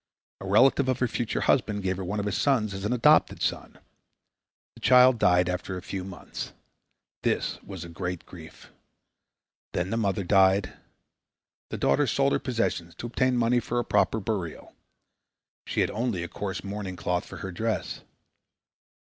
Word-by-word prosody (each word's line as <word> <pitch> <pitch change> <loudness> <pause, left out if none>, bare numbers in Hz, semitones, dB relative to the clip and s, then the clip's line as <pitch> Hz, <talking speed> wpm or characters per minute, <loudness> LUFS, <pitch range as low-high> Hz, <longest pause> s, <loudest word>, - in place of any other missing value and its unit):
A 95 - -7
relative 130 +6 +4
of 130 - +1
her 125 - +1
future 115 0 -2
husband 105 -6 +1
gave 95 -1 -1
her 95 - -4
one 100 +4 -3
of 100 - -2
his 105 -2 -1
sons 110 -3 +1
as 95 +1 -5
an 105 - 0
adopted 125 -2 +4
son. - - -3 1.0
The - - -16
child 125 -1 +6
died 90 -2 +4
after 90 +1 -3
a - - -6
few 95 -1 -5
months. 95 -2 -7 0.7
This - - -1
was 95 -3 -8
a - - -8
great 90 +1 -5
grief. 80 -3 -13 1.0
Then 90 +2 -1
the 115 - 0
mother 100 -2 0
died. 95 +1 +3 1.0
The - - -4
daughter 145 -1 +2
sold 140 +4 +2
her - - +2
possessions 105 - -2
to 120 - -7
obtain 125 +1 +1
money 120 +1 +3
for 120 0 -3
a 120 - 0
proper 105 +2 +2
burial. 95 -5 -4 0.9
She - - 0
had - - +1
only 110 -6 -2
a - - -4
coarse 95 +2 -5
mourning 100 -2 -5
cloth 90 0 -1
for - - -9
her 95 - -5
dress. 110 +5 -3
100 Hz, 170 wpm, -27 LUFS, 90-120 Hz, 1.0 s, child